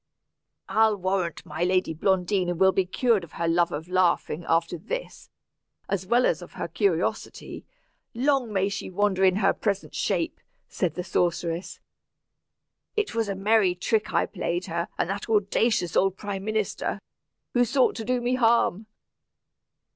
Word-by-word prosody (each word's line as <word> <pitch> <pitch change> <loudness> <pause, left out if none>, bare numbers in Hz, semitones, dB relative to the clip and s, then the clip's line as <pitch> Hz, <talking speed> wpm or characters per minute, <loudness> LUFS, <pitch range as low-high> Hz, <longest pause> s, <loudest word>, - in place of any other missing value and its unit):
"I'll 220 -1 +3
warrant 185 -2 -2
my 165 - -3
lady 185 -2 +1
Blondina 180 +1 +1
will 190 +2 +4
be 190 -1 0
cured 225 0 +2
of 170 - -12
her 170 - -2
love 170 +1 +2
of 155 +2 -5
laughing, 180 -2 +1
after 165 +1 +2
this 380 - -6 0.6
as 190 -2 -2
well 240 +4 +4
as - - +1
of - - -11
her - - -4
curiosity. 400 - -2 0.5
Long 265 -2 +1
may 195 -1 +1
she 200 - -4
wander 195 0 +1
in 185 -1 +5
her 205 - +3
present 200 -2 -2
shape," - - -1 0.3
said 175 -5 -2
the 180 - -3
sorceress. 170 0 -1 1.2
"It 420 - -1
was 225 -2 -1
a 195 - -2
merry 195 -2 +3
trick 215 +4 0
I - - +2
played 175 -2 -3
her 170 +1 -2
and - - 0
that 205 +3 -5
audacious 210 -3 +1
old 195 0 +2
prime 200 -2 -5
minister, 215 -1 -2 0.5
who 245 - +4
sought 255 +2 +2
to 225 - -4
do 250 +2 0
me 245 +1 0
harm." 230 -4 +2
195 Hz, 155 wpm, -26 LUFS, 175-220 Hz, 1.2 s, in